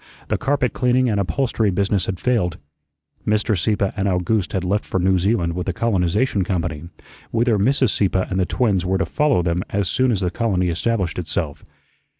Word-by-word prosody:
The - - +1
carpet 135 -4 0
cleaning 125 -1 +2
and 100 - 0
upholstery 110 +1 0
business 100 0 0
had 95 -2 -3
failed. 105 -9 0 0.7
Mr. 105 +1 +1
Sieppe 100 +2 0
and 100 -2 -1
Owgooste 90 +2 0
had 95 - -1
left 100 +3 0
for 95 - -2
New 95 +1 +2
Zealand 90 -3 +1
with 90 +2 -3
a - - -1
colonization 100 +1 +1
company, 85 -4 -3 0.4
whither 115 -2 +1
Mrs. 130 +2 +2
Sieppe 95 -2 +1
and 95 - -2
the 90 - +1
twins 100 -8 +1
were 95 +1 0
to - - 0
follow 150 - +1
them 85 +1 0
as 100 -2 -1
soon 130 +6 +2
as 105 -4 0
the 90 -2 0
colony 90 -4 0
established 90 -1 -1
itself. 80 -3 -3
100 Hz, 185 wpm, -21 LUFS, 90-115 Hz, 0.7 s, cleaning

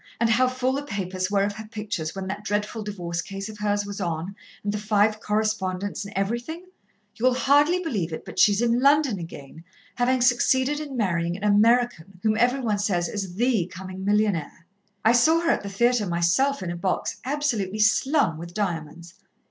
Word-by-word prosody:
and 230 0 +2
how 255 +3 +4
full 255 0 -1
the 280 - -1
papers 190 -6 -3
were 200 -1 +2
of 205 0 -1
her 220 0 -8
pictures, 210 -7 -4
when 195 -1 -4
that 200 +2 -5
dreadful 210 +1 -2
divorce 175 -5 -4
case 195 +2 -6
of 215 -1 -10
hers 205 -1 0
was 200 0 -6
on, 170 +2 -3 0.3
and 205 0 -1
the 210 - -2
five 210 0 +2
co 210 - -2
respondents 205 -3 -1
and 200 - -9
everything? 240 - -3 0.5
You'll 250 +2 +2
hardly 290 +7 +3
believe 205 - -2
it, 160 - -6
but - - -6
she's 205 +2 +5
in 235 0 +2
London 280 -5 +3
again, 160 -2 -10 0.3
having 250 +1 +2
succeeded 260 +3 +3
in 285 -4 -6
marrying 170 -5 0
an 200 - -10
American 210 -3 +2
whom 215 -1 +2
every 245 +4 +2
one 215 -4 0
says 180 -4 0
is 195 -3 -5
the 230 -5 +1
coming 185 +1 -8
millionaire. 200 -6 0 0.4
I 225 - +7
saw 315 +8 +4
her 335 -1 +2
at - - 0
the 200 - -6
theatre 235 +1 +2
myself, 175 +10 +1
in 175 - -3
a - - -4
box, 180 +2 -2
absolutely 250 -8 -1
slung 220 - +2
with 170 +1 -9
diamonds. 170 -3 -4
210 Hz, 190 wpm, -25 LUFS, 185-245 Hz, 0.5 s, I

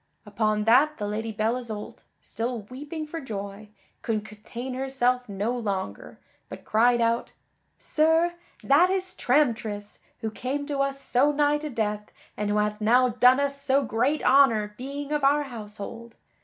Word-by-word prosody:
Upon 215 0 0
that 270 +8 +4
the 205 - -3
Lady 220 +2 -3
Belle 220 +3 0
Isoult, 220 -4 -7 0.2
still 230 +1 -4
weeping 290 +8 -7
for 325 +2 -6
joy, 205 -3 -7 0.3
could 215 -2 -2
contain 230 +4 -7
herself 250 -2 0
no 205 +5 -2
longer, 200 -5 -4 0.3
but - - -10
cried 240 +2 +3
out: 230 0 0 0.4
"Sir, 320 +2 +2 0.3
that 305 +7 +5
is 375 -1 -2
Tramtris, 230 - 0 0.2
who 220 -2 -3
came 275 +6 -3
to 285 -1 -3
us 275 0 0
so 275 +2 +2
nigh 295 0 +2
to 305 0 -5
death 210 -4 -3 0.2
and 210 0 -2
who 205 - +1
hath 210 0 0
now 250 +4 +4
done 250 +2 +5
us 280 0 -1
so 275 0 +2
great 255 +6 0
honor 225 -7 +4
being 280 +4 -6
of 295 -1 0
our 290 +2 +4
household! 230 -1 -8
245 Hz, 155 wpm, -26 LUFS, 215-280 Hz, 0.4 s, that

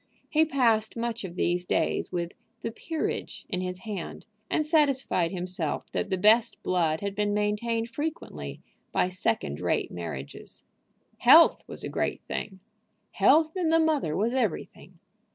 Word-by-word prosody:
He 315 +1 +4
passed 230 -7 +2
much 230 -1 -3
of 180 -2 -7
these 175 0 +1
days - - 0
with 175 -1 -2 0.3
the 230 - -2
"Peerage" 320 +7 -4
in 185 -3 -2
his 180 0 -4
hand, 200 -5 -6 0.2
and 310 - +1
satisfied 275 - +2
himself 180 -4 -3
that - - -2
the 190 - 0
best 220 +5 +4
blood 165 -4 +1
had 200 -1 -2
been 205 0 0
maintained 225 +2 0
frequently 230 - -5 0.3
by 180 - +2
second 115 - -1
rate - - 0
marriages. 80 -6 -7 0.6
Health - - +7
was - - -6
a - - -3
great - - -2
thing. 190 -1 -5 0.5
Health 315 +1 +4
in 355 -4 +1
the 325 0 +4
mother 305 - +1
was 225 +4 +1
everything. 260 - -3
210 Hz, 150 wpm, -27 LUFS, 180-260 Hz, 0.6 s, Health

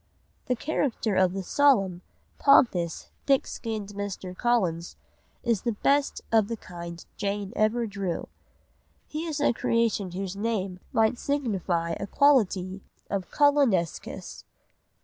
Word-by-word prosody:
_) - - -39
The 250 - +1
character 245 -6 -1
of 185 -1 +3
the 195 0 -3
solemn, 195 -8 +3 0.4
pompous, 180 - +3 0.2
thick 275 -1 +4
skinned 215 -3 -5
Mr. 200 -2 -5
Collins 180 -8 0 0.5
is 230 -5 +1
the 235 - -1
best 280 +6 +1
of 220 -2 +4
the 230 - -4
kind 170 -3 -9
Jane 200 +1 -2
ever 225 +2 +2
drew; 200 -4 -3 0.8
he 310 +2 -5
is 305 -3 -3
a - - +3
creation 225 -6 0
whose 190 0 -4
name 200 -4 -2
might 225 +2 +2
signify 195 -12 -1
a 200 - -4
quality 200 -9 +2 0.3
of 195 -3 -2
"collinesqueness." 275 - +1
205 Hz, 130 wpm, -27 LUFS, 185-240 Hz, 0.8 s, thick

